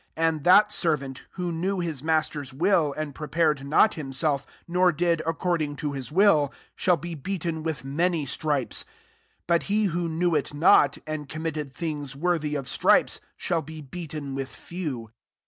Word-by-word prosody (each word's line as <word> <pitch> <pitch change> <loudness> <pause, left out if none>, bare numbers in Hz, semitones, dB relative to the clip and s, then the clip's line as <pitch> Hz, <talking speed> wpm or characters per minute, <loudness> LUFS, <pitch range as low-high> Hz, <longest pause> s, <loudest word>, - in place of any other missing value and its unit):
4f 165 - -1
^ - - +6
And 155 -3 -4
that 205 +4 +7
servant, 140 -8 -1
who 180 -2 -3
koew 190 +4 -1
lu9 160 -6 -3
master's 155 -3 0
wUU 165 0 +2
and 155 -2 -3
pre* 150 +2 -6
pared 155 -4 +1
not 150 +9 +4
himHelf, 140 -1 -2 0.2
nor 180 +1 +3
did 170 +1 +1
ac - - -4
12 165 0 -1
cording 165 -5 0
to 150 -1 -3
his 135 0 -6
will, 160 -6 +4 0.2
shall 180 -2 +3
b^ 170 -4 -7
beaten 170 -2 -3
with 155 -4 -4
many 165 +2 0
ttrifiet: 140 -2 -1
48 - - -26 0.6
but 170 -1 +2
he 210 +1 +3
who 175 -2 -1
knew 170 +2 +1
it 145 -1 -1
not, 155 +5 +5
and 155 -2 -5
committed 155 -3 -4
things 145 -3 -4
worthy 155 -1 0
of 135 -3 -3
stripes, - - +3 0.2
shall 170 -2 0
be 160 +1 -9
beaten 150 -2 -6
with 135 0 -3
few. 140 -11 -6
155 Hz, 180 wpm, -26 LUFS, 145-175 Hz, 0.6 s, that